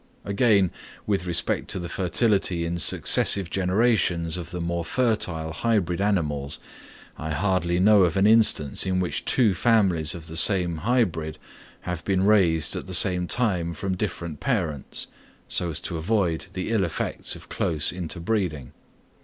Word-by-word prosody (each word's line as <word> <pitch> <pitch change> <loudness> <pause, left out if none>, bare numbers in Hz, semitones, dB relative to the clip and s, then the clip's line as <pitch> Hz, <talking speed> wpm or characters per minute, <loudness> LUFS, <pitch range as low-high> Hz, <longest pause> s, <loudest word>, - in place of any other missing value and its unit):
Again, 100 -3 +2 0.3
with 95 -4 -1
respect 85 - 0
to - - -3
the 85 - -5
fertility 95 -1 0
in 85 +1 -3
successive 90 +3 +3
generations 90 -4 +1
of 85 -2 -6
the 90 0 -6
more 85 0 -2
fertile 90 -7 -1
hybrid 95 -3 0
animals, 75 -9 -1 0.6
I 80 - -5
hardly 90 +1 0
know 105 +2 +5
of 90 +1 +2
an 95 - +3
instance 105 -10 +4
in 95 0 0
which 90 -1 -2
two 115 -6 +3
families 90 -8 +2
of 85 -2 -9
the 80 0 -9
same 90 -2 +4
hybrid 85 -7 -1 0.4
have 90 -2 -5
been 95 -1 0
raised 90 -7 +3
at - - -6
the 95 - -3
same 90 -1 +2
time 90 -7 -1
from 95 +3 -3
different 85 -5 -5
parents, 85 - -2 0.4
so 90 - -1
as 80 - -4
to 85 - -5
avoid 90 -1 -1
the 95 +3 -4
ill 110 -4 +2
effects 85 -3 -3
of - - -13
close 80 0 0
interbreeding. 85 - -3
90 Hz, 155 wpm, -24 LUFS, 85-100 Hz, 0.6 s, know